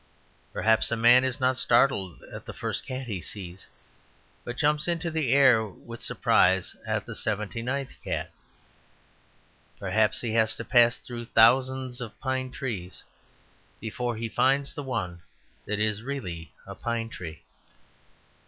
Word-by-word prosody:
Perhaps 110 0 +2
a 115 - -1
man 120 +3 +6
is 130 +1 0
not 130 0 +2
startled 95 - +2
at - - -8
the - - -7
first - - -4
cat 130 0 -4
he 100 -7 -4
sees, 90 +1 -7 0.8
but 120 0 -6
jumps 150 +1 +1
into 170 -1 0
the 155 -6 0
air 130 -5 +6
with 115 +3 -10
surprise 95 0 +2
at - - -1
the - - -7
seventy 105 +1 -2
ninth 130 +3 -3
cat. - - -3 1.5
Perhaps 110 -1 +1
he 115 -2 -2
has 110 -1 +3
to 115 - -6
pass 120 +1 +5
through 120 -1 -8
thousands 130 +2 +3
of 115 -2 -7
pine 130 -1 -2
trees 115 -9 -5 0.8
before 120 +2 -3
he 115 +1 -3
finds 135 +4 +2
the - - -5
one 105 -11 -4 0.5
that 105 - -1
is 105 0 +1
really 95 -12 -5
a - - -8
pine 115 -1 -3
tree. 80 -8 -8
120 Hz, 145 wpm, -27 LUFS, 105-130 Hz, 1.5 s, man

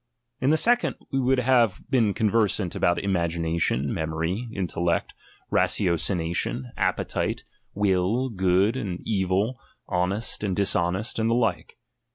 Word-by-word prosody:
In 130 - +1
the 155 - +4
second, 240 +7 +3 0.2
we 135 - +1
would 130 +1 +2
have 120 -5 +3
been 115 -7 +2
conversant 105 -4 +1
about 85 0 +2
imagination, 85 -6 0
memory, 80 +8 -2
intellect, 85 -3 -1 0.4
ratiocination, 85 -6 0
appetite, - - -1 0.3
will, 100 +5 +1
good 95 +1 +2
and 100 -9 -4
evil, 100 +4 0 0.3
honest 95 +6 -1
and 95 -3 -1
dishonest, 95 +2 0
and 110 0 +1
the 115 - +2
Uke. 100 -10 -1
95 Hz, 120 wpm, -25 LUFS, 85-115 Hz, 0.4 s, the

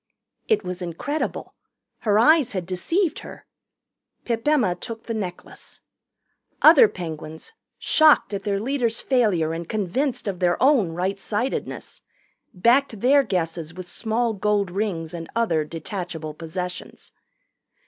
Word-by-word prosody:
It 440 - +2
was 180 0 -5
incredible. 180 - -4 0.5
Her 210 -2 +2
eyes 285 +1 +4
had 185 -3 -3
deceived 320 - -1
her. - - -11 0.8
Pip 230 +2 -2
Emma 255 -12 +3
took 225 +5 -8
the 230 - -4
necklace. 185 -5 -7 0.8
Other 470 - +9
Penguins, 160 - -8 0.2
shocked 310 -8 +4
at 195 -1 -3
their 200 -1 -1
leader's 235 -1 -1
failure 200 -12 +1
and 165 0 -6
convinced 235 +6 -1
of 190 -3 -3
their 175 -1 +2
own 255 - +3
right 190 +3 -2
sightedness, 220 +6 -4 0.5
backed 235 +3 +2
their 280 +3 +5
guesses 170 - -3
with 185 -1 -8
small 230 +3 -1
gold 205 -2 0
rings 180 -5 -3
and 165 -1 -7
other 175 -10 +1
detachable 165 0 -6
possessions. 180 +3 -7
200 Hz, 130 wpm, -23 LUFS, 175-240 Hz, 0.8 s, Other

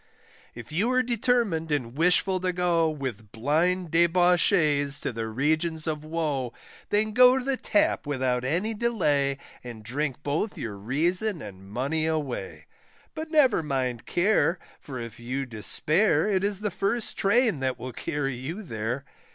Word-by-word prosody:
If 120 +1 -10
you 205 +10 +1
are 255 0 +3
determined 235 -9 0
and 125 -5 -2
wishful 180 +3 +3
to 185 0 0
go, 175 -2 +2
With 125 -9 -6
blind 160 +8 0
debauchees 170 -4 +3
to - - -3
the 115 0 -3
regions 155 +7 0
of 155 -2 -2
woe, 150 -6 -2 0.4
Then 215 +1 +2
go 250 +3 +6
to 260 - -3
the 275 -1 +1
Tap 205 - +1
without 130 -3 0
any 175 +12 0
delay, 150 -12 +1 0.3
And 120 -3 -9
drink 135 +4 -3
both 155 +9 -2
your 110 -3 -5
reason 170 - 0
and 95 -5 -10
money 140 +9 -1
away, 150 -5 -3 0.5
But 315 0 -6
never 285 - +4
mind 130 -5 -2
care, 185 -1 +2 0.2
for 130 -4 -7
if 115 -1 -8
you 130 +3 -3
despair, 155 - +1
It 195 -2 +1
is 200 0 0
the 210 -1 -1
first 215 +3 -1
train 220 - +2
that 130 -1 -1
will 130 0 -7
carry 145 -1 -2
you 165 - -6
there. 120 - -4
155 Hz, 155 wpm, -26 LUFS, 130-190 Hz, 0.5 s, go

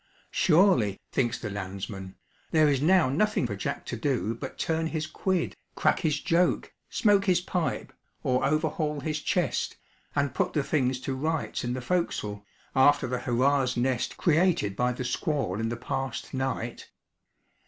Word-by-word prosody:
Surely, 155 - +4
thinks 120 -1 +1
the 105 - -5
landsman, 95 0 -6 0.3
there 155 -1 +4
is 140 -2 +2
now 180 -1 +5
nothing 165 +4 +1
for 105 -4 -3
Jack 100 - -4
to - - -4
do 120 -2 0
but 130 +3 -7
turn 160 0 0
his 160 -1 -2
quid, 185 +2 -1 0.2
crack - - +2
his 155 -4 +1
joke, 170 +4 +1 0.2
smoke 205 -2 +3
his 180 -3 +4
pipe, 175 -5 -2 0.3
or 125 0 +1
overhaul 150 +1 0
his 155 +1 -2
chest, 175 -4 0 0.4
and 140 -2 +1
put - - 0
the 150 - +1
things 130 -3 +1
to 135 - -2
rights 155 +3 -2
in 120 0 -1
the 130 - -3
forecastle, 120 - -1 0.3
after 140 +2 +5
the 125 0 -2
'hurrah's 125 +2 +2
nest' 125 0 0
created 160 - +2
by 125 0 +1
the 125 +1 -4
squall 125 - -1
in 115 0 -1
the 120 - -3
past 130 +1 -4
night? 130 -3 -3
135 Hz, 160 wpm, -28 LUFS, 120-160 Hz, 0.4 s, now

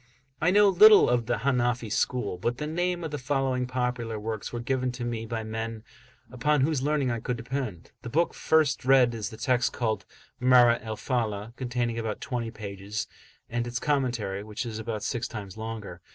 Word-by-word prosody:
[FN#28] 160 - +2
I - - +7
know 205 +1 +6
little 210 +3 +8
of 120 -1 +1
the 120 - +1
Hanafi 120 -4 0
school; 110 -5 -1
but 120 +5 -1
the 150 - -3
name 175 +2 -1
of 160 - -4
the 145 - -3
following 130 -1 0
popular 125 -3 -2
works 110 0 -4
were 120 - -4
given 130 +1 -1
to 125 -1 -5
me 115 -1 -3
by 115 0 -3
men 110 0 -5 0.5
upon 145 +4 +1
whose 145 -1 +1
learning 145 -2 +1
I 115 - -2
could 125 +2 -3
depend. 115 -7 -5
The - - -7
book 165 +7 +1
first 155 -4 +2
read 130 -2 +5
is 105 -3 -4
the 110 - -10
text, 125 +1 +1
called 110 -3 -2 0.3
Marah 125 -2 +6
al 110 -1 -5
Falah, 115 -3 -2
containing 120 -2 -2
about 110 -2 -3
twenty 120 -5 -3
pages, 105 -1 -5 0.4
and 120 0 -2
its 120 0 -3
commentary, 120 -8 -1
which 105 +3 -5
is 110 -2 -5
about 110 -2 -4
six 120 0 -2
times 100 -4 -7
longer. 110 -5 -6
120 Hz, 195 wpm, -27 LUFS, 110-130 Hz, 0.5 s, little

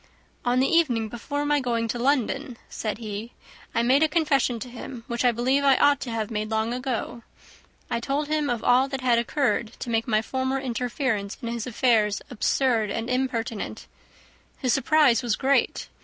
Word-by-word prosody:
"On 245 +1 +2
the 265 - +3
evening 250 -10 +2
before 285 +6 -4
my 295 0 +2
going 235 -3 -1
to 240 - -2
London," 265 0 0
said 215 -1 -3
he, 215 +1 -6 0.4
"I 230 - +2
made 260 +4 +4
a 315 - +5
confession 295 -6 +1
to 255 - -5
him, 245 0 -8
which 235 +1 -2
I 245 - +5
believe 255 +4 +1
I 275 -2 +5
ought 285 -1 +4
to 255 - -5
have 225 -1 -3
made 215 -1 -2
long 220 +1 0
ago. 245 -2 -3 0.7
I 235 - -1
told 280 +5 -2
him 305 -1 0
of 240 -2 -2
all 255 +2 +4
that 270 -1 -4
had 245 -2 +3
occurred 240 -2 0
to 240 - -5
make 225 +1 0
my 215 -1 +2
former 260 +2 -1
interference 245 -4 -2
in 235 - -5
his 235 0 -4
affairs 220 -4 +2
absurd 235 -2 +1
and 225 +4 -3
impertinent. 240 -4 -2 0.7
His 255 -2 +1
surprise 280 -3 +4
was 235 -4 0
great. 275 +1 +1
245 Hz, 185 wpm, -25 LUFS, 230-270 Hz, 0.7 s, a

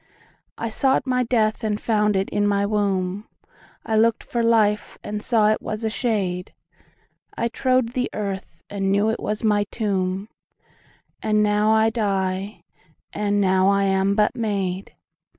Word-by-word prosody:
13I 230 -1 -3
sought 270 -1 +2
my 250 -1 +1
death 225 -2 +1
and 210 -1 -1
found 210 -2 +1
it 190 0 0
in 205 0 +1
my 200 0 +1
womb,14I 205 +2 -3
lookt 230 0 +2
for 235 - -2
life 215 -3 +2
and 210 0 -4
saw 215 -2 +3
it 215 - +1
was 215 +1 -5
a 220 - 0 1.5
shade,15I 235 0 -1
trode 255 -2 +1
the 250 -1 -1
earth 195 -5 -5
and 195 -1 -2
knew 205 +2 +2
it 225 - -3
was 210 +1 -3
my 210 -2 +3
tomb,16And 200 +1 -5
now 210 0 +2
I 220 0 +3
die, 195 -2 -2 0.5
and 205 -1 0
now 190 -1 +3
I 200 0 +3
am 195 0 +2
but 210 +3 +2
made. 200 -5 -3
210 Hz, 145 wpm, -23 LUFS, 195-220 Hz, 1.5 s, saw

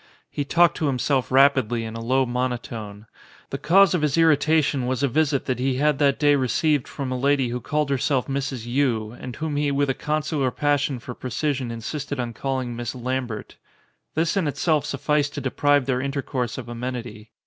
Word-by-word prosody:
He 145 - -2
talked 170 +4 +3
to 155 - 0
himself 130 -1 0
rapidly 130 -4 +4
in 110 0 -6
a - - -5
low 130 +3 +2
monotone. 120 -4 -4 0.5
The - - -3
cause 190 +3 +5
of 180 - +1
his 150 0 +1
irritation 155 -4 +3
was 130 +2 -1
a - - +4
visit 145 +1 +1
that 125 -2 -1
he 130 0 0
had 145 +1 +1
that 140 -2 +3
■day 145 -2 +4
received 145 +2 +1
from 135 -2 -5
a 130 - -2
lady 135 -1 +2
who 125 +1 -3
called 150 +3 -1
herself 135 -1 +1
Mrs. 135 -4 -3
Yii 120 -3 0
and 125 -1 -6
whom 155 -1 -3
he 145 0 +1
with 140 0 +1
a - - -1
consular 150 -1 -1
passion 145 0 0
for 125 +1 -8
pre 130 - -7
cision 130 0 -1
insisted 135 +5 -5
on 120 -1 -3
calling 130 0 -3
Miss 120 +1 -4
Lambert. 125 -3 -4 0.6
This 165 +4 +1
in 190 -6 +1
itself 150 0 +1
sufficed 145 +1 0
to - - -3
deprive 145 +1 +2
their 130 -1 0
intercourse 135 -3 -3
of 125 -3 -7
amenity. 120 -2 -6
135 Hz, 190 wpm, -24 LUFS, 125-145 Hz, 0.6 s, cause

